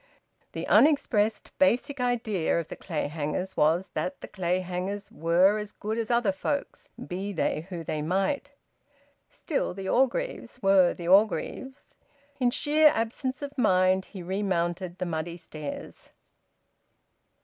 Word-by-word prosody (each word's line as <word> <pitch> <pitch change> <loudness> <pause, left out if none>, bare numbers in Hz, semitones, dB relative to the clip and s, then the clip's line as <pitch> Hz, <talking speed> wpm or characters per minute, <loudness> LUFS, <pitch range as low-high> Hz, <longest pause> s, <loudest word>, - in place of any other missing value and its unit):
The - - -4
unexpressed 225 -8 +3
basic 280 0 +2
idea 225 -9 0
of 165 - -6
the - - -6
Clayhangers 155 +2 -3
was 165 +5 +2
that 280 - -3
the - - -8
Clayhangers 185 +1 -3
were 180 +6 +3
as 210 0 -6
good 220 +2 -3
as 225 - -3
other 235 -4 +3
folks, 280 +9 -4 0.2
be 195 +3 -4
they 165 -2 -1
who 175 -3 -5
they 155 -1 -3
might. 195 - 0 0.8
Still, 295 - -3
the 195 -1 -6
Orgreaves 265 - 0
were 195 -3 +4
the 170 - -7
Orgreaves... 220 +7 +1 0.5
In 250 -2 +3
sheer 300 +4 +4
absence 255 +4 -2
of 285 0 -6
mind 185 -2 +3
he 190 -4 -9
remounted 180 -1 -2
the 185 - -2
muddy 170 0 -3
stairs. 155 -3 -8
195 Hz, 130 wpm, -27 LUFS, 175-240 Hz, 0.8 s, were